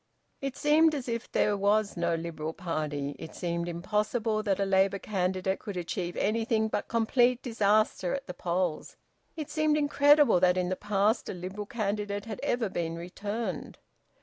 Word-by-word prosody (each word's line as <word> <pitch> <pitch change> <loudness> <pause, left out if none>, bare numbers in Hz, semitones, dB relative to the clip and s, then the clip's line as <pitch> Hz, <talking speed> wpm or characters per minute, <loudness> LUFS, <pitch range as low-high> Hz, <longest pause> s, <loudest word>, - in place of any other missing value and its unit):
It 275 -1 -4
seemed 310 +1 +4
as 265 -3 -5
if 235 0 -4
there 210 - +2
was 205 +1 +2
no 170 -1 0
Liberal 160 -1 -4
party. 150 -5 -3
It 160 - -9
seemed 170 -1 -2
impossible 215 +5 -1
that 200 -3 0
a 200 - +2
Labour 195 0 +3
candidate 190 -1 -1
could 200 -3 -6
achieve 175 0 -3
anything 220 +1 +1
but - - -2
complete 240 +2 +2
disaster 215 -4 +2
at 275 0 -6
the - - -6
polls. 175 -2 -2 0.4
It 310 -2 -6
seemed 305 0 +2
incredible 290 -6 +5
that 180 0 +4
in 180 -1 0
the 185 - 0
past 210 +3 +1
a - - -4
Liberal 190 +4 -6
candidate 205 -2 -2
had 215 -3 -6
ever 240 -2 0
been 165 -3 -3
returned. 200 +2 -5
205 Hz, 165 wpm, -29 LUFS, 180-230 Hz, 0.4 s, incredible